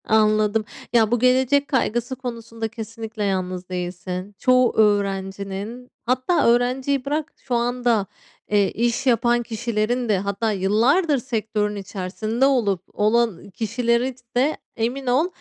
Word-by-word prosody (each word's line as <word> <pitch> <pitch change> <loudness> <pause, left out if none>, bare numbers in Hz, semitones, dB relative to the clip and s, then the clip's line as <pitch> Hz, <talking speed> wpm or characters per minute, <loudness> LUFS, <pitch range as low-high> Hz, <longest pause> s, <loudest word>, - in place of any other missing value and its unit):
Anladım. 215 0 +3 0.3
Ya, 225 -2 +4
bu 240 - +2
gelecek 260 +3 +3
kaygısı 245 -1 0
konusunda 230 -3 -5
kesinlikle 225 -1 -6
yalnız 185 -2 -2
değilsin. 180 +2 -5
Çoğu 255 -1 +4
öğrencinin, 200 +2 0 0.2
hatta 255 +7 +2
öğrenciyi 255 +3 +2
bırak, 300 +2 -2
şu 255 -3 -4
anda, 240 -3 +1 0.5
eee, 205 -2 +3
iş 240 +3 0
yapan 240 0 +3
kişilerin 235 +1 -1
de, 205 - +3
hatta 200 +3 -1
yıllardır 235 - +2
sektörün 220 -4 -2
içerisinde 205 +5 -2
olup, 220 -10 +2
olan, 220 -2 +1
iii, - - -14
kişilerin 235 +4 0 0.2
de 280 +5 +2 0.2
emin 250 +3 -2
ol, 265 +7 +3
230 Hz, 125 wpm, -22 LUFS, 205-250 Hz, 0.5 s, Ya